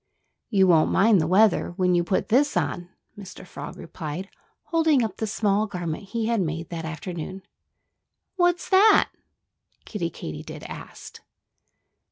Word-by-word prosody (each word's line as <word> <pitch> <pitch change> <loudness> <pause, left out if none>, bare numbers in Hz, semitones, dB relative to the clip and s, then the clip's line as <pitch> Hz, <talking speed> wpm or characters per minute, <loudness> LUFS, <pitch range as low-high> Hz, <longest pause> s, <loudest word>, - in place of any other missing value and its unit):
"You 195 -4 +4
won't 165 -4 +4
mind 200 -2 +4
the 155 - -1
weather 190 0 +3
when 180 -1 +2
you 175 -1 +3
put 185 +5 -1
this 280 +6 +3
on," 175 0 -2 0.3
Mr. 190 -2 -11
Frog - - -9
replied, 170 +4 -7 0.3
holding 320 -6 +2
up 220 - -4
the 220 - -2
small 205 0 +1
garment 175 -1 -5
he 225 +3 -3
had 230 -2 +1
made 165 -1 -3
that 165 -2 -5
afternoon. 175 +3 -6 0.9
"What's 350 -1 +1
that?" 405 +3 +5 0.7
Kiddie 175 -6 -3
Katydid 75 - -8
asked. - - -10
190 Hz, 140 wpm, -25 LUFS, 170-225 Hz, 0.9 s, that